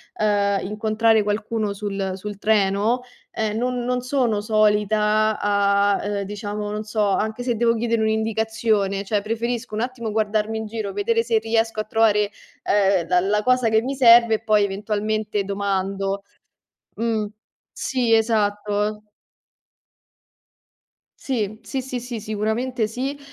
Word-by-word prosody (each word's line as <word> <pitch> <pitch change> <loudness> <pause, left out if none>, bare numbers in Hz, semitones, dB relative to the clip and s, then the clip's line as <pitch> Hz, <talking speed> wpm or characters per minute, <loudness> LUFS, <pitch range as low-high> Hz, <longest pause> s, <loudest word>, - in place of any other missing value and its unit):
ehm, 200 -2 +1
incontrare 220 +2 +2
qualcuno 210 +1 -1
sul 195 -2 -3
sul 200 +1 -7
treno, 210 +3 +2 0.3
ehm, 215 -1 -2
non 250 0 -1
non 250 0 0
sono 250 -5 0
solita 215 0 +2
a 200 0 +2
a - - -6 0.2
ehm, - - -2
diciamo, 205 +1 -5
non 210 +1 -3
so 210 -1 0
anche 215 +4 -1
se 245 -1 0
devo 230 +1 +2
chiedere 230 0 0
un'indicazione, 220 -2 0
cioè 205 0 0
preferisco 230 +2 -3
un 220 - -1
attimo 245 -2 -3
guardarmi 215 0 0
in 220 - -4
giro, 215 -2 -4
vedere 230 +3 +1
se 230 -1 +1
riesco 225 0 0
a - - -4
trovare, 215 -2 +2 0.3
ehm, 195 -4 +2
la 180 0 +3
la 205 +3 0
cosa 255 -1 +3
che 220 0 +3
mi 265 +3 -2
serve 235 -3 +7
e - - -3
poi 215 -2 +3
eventualmente 210 +1 -2
domando. 195 0 -2 0.7
Mh, 225 -2 0 0.5
sì 250 -3 -1
esatto. 210 -1 +1 2.2
Sì, 215 -5 -2
sì, 265 -2 -3
sì, 255 -1 -4
sì, 240 -2 -6
sicuramente 220 +3 -1
sì, 260 +6 -4
215 Hz, 140 wpm, -22 LUFS, 205-230 Hz, 2.2 s, serve